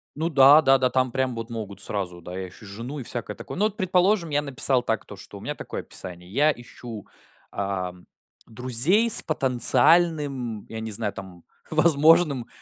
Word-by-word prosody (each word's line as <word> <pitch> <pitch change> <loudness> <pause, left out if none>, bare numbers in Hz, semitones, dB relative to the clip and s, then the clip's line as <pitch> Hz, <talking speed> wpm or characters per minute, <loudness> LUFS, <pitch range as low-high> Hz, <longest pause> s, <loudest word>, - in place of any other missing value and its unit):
Ну 160 +3 -2
да, 145 +1 +7
да, 135 -3 +4
да. 130 -1 +1
Там 130 -1 0
прям 130 -1 -1
вот 115 +1 -6
могут 110 -4 -7
сразу: 90 -4 -5
да, 90 +2 -8
я 95 -1 -5
ищу 95 - -16
жену 115 +9 -7
и - - -6
всякое 115 -3 -6
такое. - - -9
Ну 205 - +2
вот, 215 -1 -3
предположим, 185 0 +1
я 145 -1 0
написал 135 -2 0
так, - - -2
то - - -11
что - - -12
у - - -12
меня - - -5
такое - - -7
описание: 90 0 -10
"Я 145 +7 +3
ищу, 120 -4 -10 0.4
ам, 90 -3 -4 0.4
друзей 130 - +3
с - - +5
потенциальным" 135 - +1
я 110 - -6
не 110 0 -5
знаю, 100 0 0
там 95 -3 -11 0.3
"возможным 155 -4 +4
130 Hz, 185 wpm, -24 LUFS, 105-150 Hz, 0.4 s, да